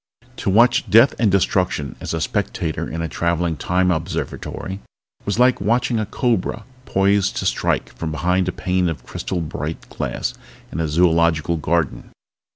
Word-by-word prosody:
To - - -1
watch 120 +3 +4
death 115 +7 +7
and 115 -3 +4
destruction 90 -7 +1
as - - -4
a - - -2
spectator 80 -3 -2
in 85 +1 -3
a - - -1
traveling 85 +2 0
Time 90 +6 +1
Observatory 95 +3 -4 0.5
was 100 - -1
like 125 -2 +4
watching 115 +3 +1
a 110 - -2
cobra 115 -2 -1 0.2
poised 100 0 +2
to - - -2
strike - - 0
from 80 - -4
behind 90 +3 +1
a - - +1
pane 90 0 0
of 80 - -6
crystal 90 -2 -3
bright 75 0 -5
glass - - -3 0.4
in 80 - -4
a 80 - 0
zoological 85 0 +2
garden. 80 -1 -1
90 Hz, 160 wpm, -21 LUFS, 80-100 Hz, 0.5 s, death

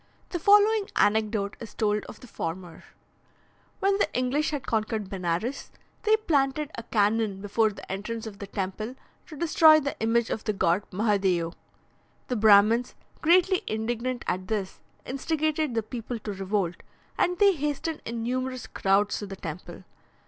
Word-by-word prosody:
The 350 - -3
following 415 +3 +5
anecdote 210 -1 +1
is 225 - -10
told 210 -1 0
of - - -11
the 250 - -12
former: 170 -3 -6 1.0
When 395 +1 +2
the - - +1
English 265 +5 +1
had 290 -3 -4
conquered 215 -2 -2
Benares, 190 +8 -2 0.3
they 435 0 +4
planted 295 -6 0
a - - -5
cannon 210 -2 +1
before 210 +2 +1
the 205 - -10
entrance 220 +4 -4
of 210 -3 -8
the 200 - -6
temple 200 +5 -4 0.3
to 305 - -10
destroy 315 -1 +6
the 280 -1 -3
image 225 +1 +1
of 220 - -3
the 215 - 0
god 190 -1 +2
Mahadeo. 190 -4 +1 0.8
The 250 - 0
Brahmins, 215 +2 +5 0.3
greatly 360 +3 +4
indignant 235 +3 -2
at 185 +1 -2
this, 205 -4 -3 0.3
instigated 305 0 -1
the 225 - +1
people 235 +1 -5
to 210 -2 -6
revolt, 190 -2 -1 0.4
and 360 0 +1
they 405 -1 +5
hastened 300 +1 -3
in 230 0 -4
numerous 255 0 -2
crowds 200 +1 +1
to 205 - -6
the 195 - -7
temple. 175 0 -8
225 Hz, 155 wpm, -27 LUFS, 200-280 Hz, 1.0 s, destroy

